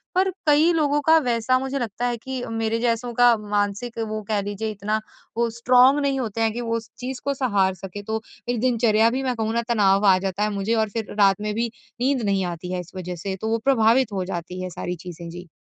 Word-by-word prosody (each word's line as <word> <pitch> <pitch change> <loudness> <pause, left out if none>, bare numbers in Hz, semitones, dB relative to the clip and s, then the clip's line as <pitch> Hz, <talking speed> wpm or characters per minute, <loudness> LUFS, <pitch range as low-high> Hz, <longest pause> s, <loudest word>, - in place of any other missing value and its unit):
पर 380 +1 +3 0.2
कई 300 +3 +5
लोगों 295 -2 +2
का 320 +3 +5
वैसा 245 -2 +1
मुझे 265 +1 -3
लगता 240 0 -3
है 240 -1 -1
कि 260 +2 -5
मेरे 225 0 -1
जैसों 235 0 -1
का 245 0 +5
मानसिक 210 +3 -2
वो 215 0 -4
कह 210 -2 +1
लीजिए 205 +2 -4
इतना 210 +1 -2 0.4
वो 235 0 +2
स्ट्रांग 250 +4 +4
नहीं 275 -2 0
होते 225 -3 -3
हैं 225 -1 +2
कि 240 - -4
वो 230 -1 -1
उस 230 0 -9
चीज़ 255 0 -5
को 280 - +1
सहार 205 -8 +1
सके। 195 +2 -8
तो 220 +1 -3 0.3
एक 245 -1 0
दिनचर्या 230 -3 +3
भी 260 +3 -2
मैं 255 -2 -1
कहूँ 220 -1 -1
ना 235 - +1
तनाव 200 -3 +3
आ 190 -1 +6
जाता 195 +1 -2
है 210 - +1
मुझे 200 +3 0
और 220 -1 +1
फिर 220 0 -5
रात 195 0 +4
में 210 0 -2
भी 230 +1 -1 0.3
नींद 265 0 +2
नहीं 195 -2 +1
आती 175 +1 -5
है 180 - -1
इस 175 - -14
वजह 180 -1 -5
से। 190 +3 -4
तो 220 - -2
वो 225 - +2
प्रभावित 240 -2 +4
हो 190 -2 -2
जाती 180 0 -5
है 185 - -4
सारी 180 +1 -4
चीज़ें 170 -1 -8
जी। 175 +1 -9
225 Hz, 240 wpm, -23 LUFS, 200-245 Hz, 0.4 s, आ